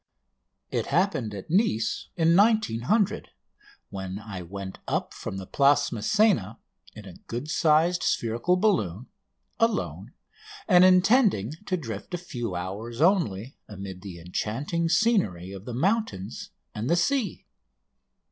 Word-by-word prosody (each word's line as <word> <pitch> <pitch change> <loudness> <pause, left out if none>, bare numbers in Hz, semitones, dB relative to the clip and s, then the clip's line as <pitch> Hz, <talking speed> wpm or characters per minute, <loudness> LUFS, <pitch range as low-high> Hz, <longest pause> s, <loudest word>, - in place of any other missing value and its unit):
It - - -1
happened 160 - 0
at 100 +8 -8
Nice 160 - +1
in 165 -1 +3
1900, 205 - +2 0.6
when 95 -1 -5
I 100 -3 -7
went 95 +2 -7
up - - -2
from 95 - -6
the 95 - -6
Place 140 +6 +3
Masséna 115 - +1 0.4
in 105 -2 -10
a 95 -3 -11
good 125 +7 -4
sized 165 +3 +3
spherical 120 +11 +1
balloon, 130 - 0 0.5
alone, 225 -2 -1 0.5
and 180 -3 +6
intending 185 - +4 0.2
to 185 - 0
drift 115 - -6
a - - -2
few 120 - -5
hours 105 +7 -5
only 145 - +1
amid 95 -2 -8
the 95 -4 -9
enchanting 135 - -2
scenery 160 - +1
of 100 0 -9
the 125 - -6
mountains 200 - -1 0.2
and 115 +4 -3
the 170 - +4
sea. 220 +4 0
130 Hz, 130 wpm, -26 LUFS, -, 0.6 s, and